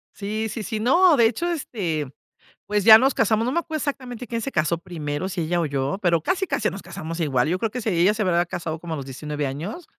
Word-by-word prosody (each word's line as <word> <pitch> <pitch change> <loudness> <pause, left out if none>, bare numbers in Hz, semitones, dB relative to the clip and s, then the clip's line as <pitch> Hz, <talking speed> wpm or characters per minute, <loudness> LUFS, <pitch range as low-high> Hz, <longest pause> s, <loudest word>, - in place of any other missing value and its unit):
Sí, 215 +2 -3
sí, 215 +1 -5
sí, 215 +2 -3
no, 340 +8 +5
de 235 -3 +5
hecho, 245 +10 -1
este, 180 - -2 0.6
pues, 205 -1 0
ya 220 -1 +11
nos 265 +3 +2
casamos, 220 0 +2
no 255 - 0
me 340 - +2
acuerdo 315 -2 -4
exactamente 255 -4 -4
quién 230 -2 -3
se 275 - -4
casó 160 +2 +1
primero, 165 -1 -4
si 180 -2 -3
ella 170 +2 0
o 165 - 0
yo, 140 +4 -2
pero 170 -3 +3
casi 380 - -1
casi 280 -8 0
nos 195 - -6
casamos 165 -2 -6
igual, 135 -4 +1
yo 180 +3 0
creo 225 +1 -1
que 250 - -4
si 220 -2 -1
ella 175 +3 +3
se 215 0 -2
habrá 175 -3 +2
casado 165 -2 -5
como 165 -1 -5
a - - -3
los 135 - -6
19 145 +2 -4
años. 175 - -6
195 Hz, 250 wpm, -23 LUFS, 160-235 Hz, 0.6 s, ya